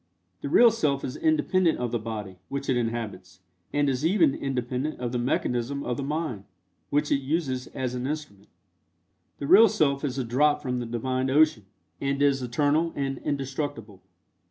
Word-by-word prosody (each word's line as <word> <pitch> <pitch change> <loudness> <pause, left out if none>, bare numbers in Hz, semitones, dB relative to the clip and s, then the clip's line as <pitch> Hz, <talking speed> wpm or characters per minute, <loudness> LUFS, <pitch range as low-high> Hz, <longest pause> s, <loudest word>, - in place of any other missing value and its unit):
The 140 - -4
real 235 +9 +7
Self 150 -11 0
is 130 - -5
independent 160 +3 +2
of 120 -2 -2
the 120 - 0
body, 105 -4 -6
which 140 0 -4
it 130 - +3
inhabits, 115 -6 -4 0.3
and 145 0 +1
is 135 0 -1
even 165 -4 +4
independent 130 +2 -3
of 120 -1 -3
the 125 - -1
mechanism 125 +2 -1
of 125 - -2
the 140 - -4
mind, 145 -8 -3 0.4
which 145 +1 0
it 140 - +3
uses 135 -3 -2
as 125 -1 -4
an 125 +1 -3
instrument. 145 -10 -6 0.9
The 140 - -5
real 210 +9 +8
Self 140 -5 +1
is 135 -2 -2
a 130 - 0
drop 145 +5 +2
from 125 -4 -2
the 120 - -4
Divine 130 +3 -1
Ocean, 145 -7 +3 0.3
and 140 0 -1
is 140 -2 +3
eternal 145 +6 +1
and 135 -1 -2
indestructible. 135 -7 -4
135 Hz, 175 wpm, -26 LUFS, 120-150 Hz, 0.9 s, real